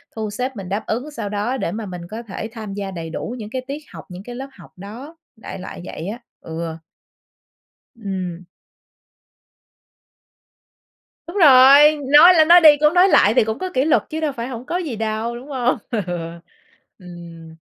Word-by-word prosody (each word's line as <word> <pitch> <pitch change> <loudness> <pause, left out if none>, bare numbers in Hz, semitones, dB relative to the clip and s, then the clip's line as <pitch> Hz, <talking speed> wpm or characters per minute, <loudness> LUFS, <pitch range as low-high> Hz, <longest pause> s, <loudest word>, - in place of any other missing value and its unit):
thu 215 -1 -4
xếp 250 +4 -4
mình 190 -3 -8
đáp 205 +3 -3
ứng 250 +7 -3
sao 215 -7 -6
đó 210 +6 -2
để 170 - -3
mà 220 0 -5
mình 180 -2 -8
có 230 +2 -6
thể 220 +1 -7
tham 215 -3 -8
gia 200 -1 -5
đầy 165 -3 -7
đủ 230 +8 -6
những 210 -1 -8
cái 260 - -3
tiết 290 +2 -6
học, - - -10
những 180 +2 -10
cái 245 +1 -9
lớp 270 +2 -7
học - - -16
đó, 245 - -11 0.2
đại 220 - -9
loại 180 - -9
vậy 165 - -7
á, 230 +4 -6 0.2
ừ. 160 0 -6 1.2
Ừm. 185 -5 -6 2.8
Đúng 365 +4 -7
rồi, 285 0 +7
nói 300 +7 +7
lên 315 -2 +4
nói 345 +1 +8
đi 300 -2 +7
cũng 300 +2 +3
nói 365 +2 +5
lại 210 -8 +4
thì 240 - +4
cũng 220 +3 -4
có 370 - -4
kỷ 260 +2 +1
luật 315 - +2
chứ 315 - -4
đâu 310 -2 -1
phải 235 -1 -6
hổng 250 -1 -8
có 350 - -2
gì 310 -10 -4
đâu, 220 +2 -3
đúng 250 +4 -10
hông? 250 -2 0
Ừ, 220 -3 -1 1.0
ừm. 170 -3 -12
230 Hz, 190 wpm, -20 LUFS, 200-280 Hz, 2.8 s, nói